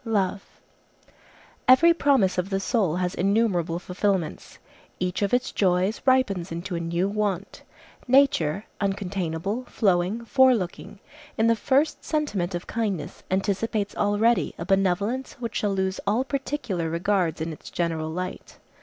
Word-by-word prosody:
LOVE 200 -4 0 1.2
Every 315 +7 +7
promise 270 - +2
of 180 +2 -2
the 195 -1 0
soul 195 -5 +1
has 180 0 -1
innumerable 190 -4 +1
fulfilments; 180 -2 -2 0.4
each 180 +1 -2
of 200 - +1
its 245 0 +1
joys 185 +2 +1
ripens 200 -10 +2
into 170 +2 -4
a - - -2
new 170 +2 -1
want. 200 -2 -2 0.5
Nature, 230 - +3 0.2
uncontainable, 195 +2 -2
flowing, 195 +2 +1
forelooking, 235 -8 +2 0.4
in 220 - +3
the 230 0 +4
first 280 +7 +1
sentiment 205 - -1
of 175 - -5
kindness 205 -9 -3
anticipates 200 +2 -1
already 210 +3 +2
a - - -5
benevolence 195 +6 0
which 235 -3 -5
shall 205 -2 0
lose 190 0 -1
all 220 +6 +2
particular 265 - -3
regards 175 0 0
in 160 +1 -3
its - - -11
general 165 -2 -2
light. 180 +3 -6
195 Hz, 135 wpm, -25 LUFS, 180-230 Hz, 1.2 s, Every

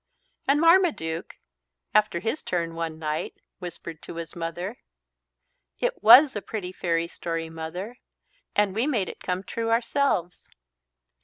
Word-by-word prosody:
And 280 +2 +4
Marmaduke, 330 - +3 0.6
after 210 -5 +3
his 225 +7 -2
turn 170 -2 -2
one 165 -1 -4
night, 155 -1 -3 0.2
whispered 170 -3 -8
to - - -8
his 165 -1 -7
mother 175 +6 -4 1.0
"It - - -1
was 250 +6 +9
a 205 - -2
pretty 195 -3 -5
fairy 170 -2 0
story, 165 -1 -4
Mother. 175 +8 -6 0.6
And 205 -2 +3
we 225 +7 +1
made 220 -11 0
it - - -9
come 180 +1 -2
true 225 +3 -3
ourselves." 230 -6 0
180 Hz, 135 wpm, -26 LUFS, 165-230 Hz, 1.0 s, was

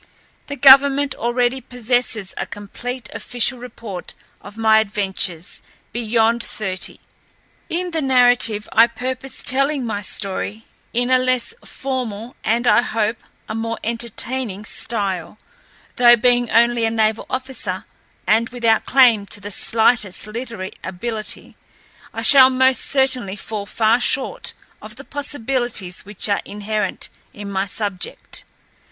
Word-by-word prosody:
The 285 - -5
government 275 +1 +6
already 245 +2 0
possesses 245 -4 -1
a - - -4
complete 240 +5 -7
official 245 +1 0
report 225 -6 -8 0.3
of 205 +2 -12
my 220 -1 +5
adventures 195 -5 -1 0.3
beyond 230 0 +1
thirty. 190 -4 -3 0.7
In 355 +1 -2
the 325 -1 -1
narrative 245 -5 +3
I 230 +1 +7
purpose 260 +2 -4
telling 275 0 +1
my 210 -3 -3
story 200 +2 -4 0.3
in 245 +2 0
a 255 - +5
less 255 - +1
formal, 245 -4 -5
and 235 +2 +1
I 235 - +5
hope, 225 -2 -1 0.3
a - - -5
more 225 0 -3
entertaining, 235 -2 -4
style; 200 -6 -2 0.6
though, 240 -1 +7
being 245 0 +2
only 235 0 +3
a 225 - +2
naval 220 -1 0
officer 235 -7 -4 0.4
and 225 +2 +2
without 230 -3 +1
claim 240 -6 +5
to 205 - -3
the 205 0 -8
slightest 220 -2 +3
literary 225 -3 -6
ability, 215 +4 -6 0.6
I - - -5
shall 265 -2 +8
most 260 0 +3
certainly 260 -7 +1
fall 205 0 -6
far 225 +2 +2
short 260 +2 0 0.3
of - - -9
the - - -10
possibilities 245 -9 -2
which 205 +1 0
are 200 -1 +1
inherent 210 +1 -3 0.2
in 205 -1 -8
my 195 0 -1
subject. 200 -2 -5
230 Hz, 130 wpm, -20 LUFS, 210-255 Hz, 0.7 s, shall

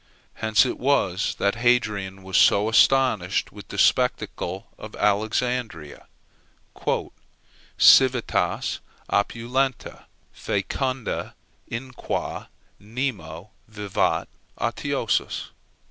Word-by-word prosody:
Hence 110 +2 +3
it 125 - -3
was 105 -9 +1
that 100 0 +1
Hadrian 105 -6 +1
was 95 -1 -6
so 105 +2 +5
astonished 110 -4 +3
with - - -12
the - - -8
spectacle 95 +3 +1
of 110 - -9
Alexandria, 110 - -1 1.7
"civitas 130 -3 +4 0.3
opulenta, 120 +5 -1 0.3
fæcunda, 125 +5 -3 0.3
in 130 +3 -6
qua 125 - -4 0.3
nemo 105 - -5 0.2
vivat 105 -3 -1 0.3
otiosus." - - -1
110 Hz, 80 wpm, -24 LUFS, 100-125 Hz, 1.7 s, so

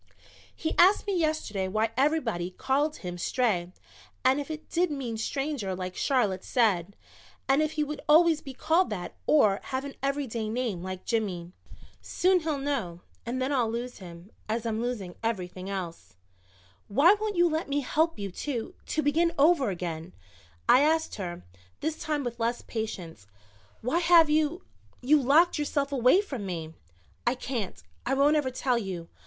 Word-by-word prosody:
"He 320 - -2
asked 375 +4 +6
me 400 -2 -1
yesterday 310 - -1
why 215 +3 0
everybody 255 - +1
called 280 +10 0
him 175 -1 -6
Stray 180 -5 0 0.5
and 265 +3 +4
if 285 - -8
it 315 0 -6
did 355 +1 +1
mean 265 -6 -4
Stranger 260 -4 -2
like 185 0 -5
Charlotte 210 -9 +1
said, 200 -6 +1 0.5
and 270 +2 +4
if 310 0 0
he 305 - 0
would 300 0 -5
always 320 0 +6
be 270 -3 -9
called 335 +7 +2
that 185 -4 -5
or 210 -10 +4
have 265 +1 -3
an 280 - -6
everyday 265 -6 -2
name 225 -6 -2
like 185 0 -6
Jimmy. 185 -7 -2 0.5
Soon 370 0 +2
he'll 315 -3 -2
know 260 -12 -3 0.3
and 250 +2 -2
then 260 +2 0
I'll 245 -4 +2
lose 240 +2 -4
him 175 +1 -11 0.2
as 225 +1 -1
I'm 225 -1 -1
losing 225 -7 -3
everything 185 -4 -3
else." 180 - -6 0.7
"Why 285 - +6
won't 430 -2 -1
you 345 0 +5
let 315 -2 -2
me 285 +1 +1
help 320 +5 +1
you 200 -2 -4
to 235 +3 -4
to 310 - 0
begin 325 +4 +2
over 285 -3 +4
again?" 170 -2 -5 0.5
I 255 - +7
asked 320 +2 +2
her, 175 - -5 0.4
this 315 0 -2
time 300 -2 -1
with 240 -1 -5
less 235 +1 -1
patience. 180 - -6 0.5
"Why 255 +9 +1
have 335 -3 +6
you 310 +4 +1 0.3
you 290 +4 +4
locked 305 +6 +4
yourself 285 -1 -1
away 260 - +4
from 270 - -6
me?" 165 -4 -5 0.5
"I 240 - +3
can't 245 -6 -4 0.2
I 265 +3 0
won't 285 +3 +4
ever 295 -4 +1
tell 250 -1 0
you. 185 -6 -5
255 Hz, 170 wpm, -28 LUFS, 195-300 Hz, 0.7 s, I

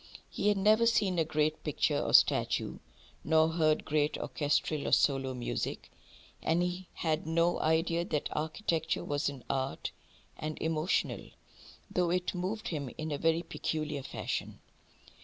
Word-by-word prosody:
He - - -1
had 205 -1 +4
never 215 +4 +4
seen 195 -6 +2
a - - +4
great 155 0 0
picture - - +1
or - - +2
statue, - - +3 0.4
nor 160 +1 +4
heard 155 -2 +2
great 150 0 +1
orchestral 145 0 -1
or - - -1
solo 135 -2 +3
music; 120 - -4 0.5
and 165 +2 +2
he 180 +1 -3
had 160 -1 -1
no 170 +2 +2
idea 165 +2 +2
that 150 -5 -1
architecture 160 +1 -1
was 145 0 0
an 135 -4 -9
art 135 0 -2 0.4
and 155 0 -5
emotional, 160 +2 -1 0.6
though 180 -1 +1
it 180 +1 0
moved 190 +4 -3
him 145 -6 -3
in 155 0 -4
a 145 - -2
very 165 +1 +2
peculiar 155 -4 -3
fashion. 135 - -4
160 Hz, 145 wpm, -31 LUFS, 150-175 Hz, 0.6 s, had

